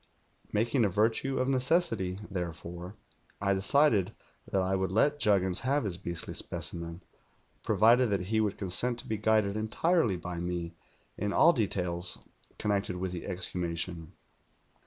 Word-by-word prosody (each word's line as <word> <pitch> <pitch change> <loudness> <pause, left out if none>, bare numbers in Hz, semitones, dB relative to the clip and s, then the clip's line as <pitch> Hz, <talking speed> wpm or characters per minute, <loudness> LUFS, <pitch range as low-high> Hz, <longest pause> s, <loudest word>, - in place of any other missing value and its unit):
Making 115 +4 +2
a 105 - +3
virtue 115 +7 +1
of 130 - +1
ne 135 -1 +2
cessity, 115 - +1
therefore, 90 0 -6 0.4
I 100 -1 +2
decided 105 0 +3 0.4
that 95 -1 +2
I 95 +1 +1
would 95 -1 -1
let 145 +8 +2
Juggins 95 -6 +2
have 140 +2 +1
his 100 -5 -2
beastly 85 -3 -4
specimen, 85 +1 -5 0.6
provided 115 +4 +4
that 100 -2 0
he 110 - +4
would 105 -2 -1
consent 105 +6 +1
to - - -15
be 110 - -1
guided 105 -1 +2
entirely 110 - +1
by 90 0 -5
me 85 -1 -3 0.5
in 105 +1 -1
all 170 +11 +6
details 90 - -2 0.4
connected 100 -3 -1
with 90 0 -3
the 90 -2 -6
exhumation. 85 -2 -3
100 Hz, 145 wpm, -30 LUFS, 90-115 Hz, 0.6 s, all